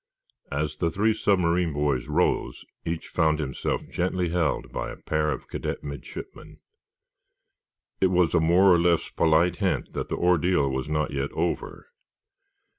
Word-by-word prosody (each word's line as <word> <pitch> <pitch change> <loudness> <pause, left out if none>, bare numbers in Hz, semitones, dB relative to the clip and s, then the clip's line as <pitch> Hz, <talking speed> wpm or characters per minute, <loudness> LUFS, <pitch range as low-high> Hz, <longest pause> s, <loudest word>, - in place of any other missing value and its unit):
As 75 +2 -2
the 85 - +1
three 105 +6 +2
submarine 90 -5 +1
boys 70 -3 0
rose, 80 +4 0 0.2
each 85 0 -3
found 80 -2 +2
himself 70 -4 -2
gently 90 0 -1
held 85 -3 -1
by - - -4
a - - -7
pair 75 0 -1
of 70 - -5
cadet - - -4
midshipmen. 70 0 -9 1.4
It 95 - +4
was 90 -2 +2
a 85 - +4
more 90 +4 +5
or 85 - +4
less 85 -1 +2
polite 85 +2 +2
hint 95 -4 -1
that - - -4
the - - -2
ordeal 90 -4 +2
was 65 +2 -3
not 75 0 0
yet 70 0 -2
over. 85 +2 -3
85 Hz, 150 wpm, -26 LUFS, 75-90 Hz, 1.4 s, more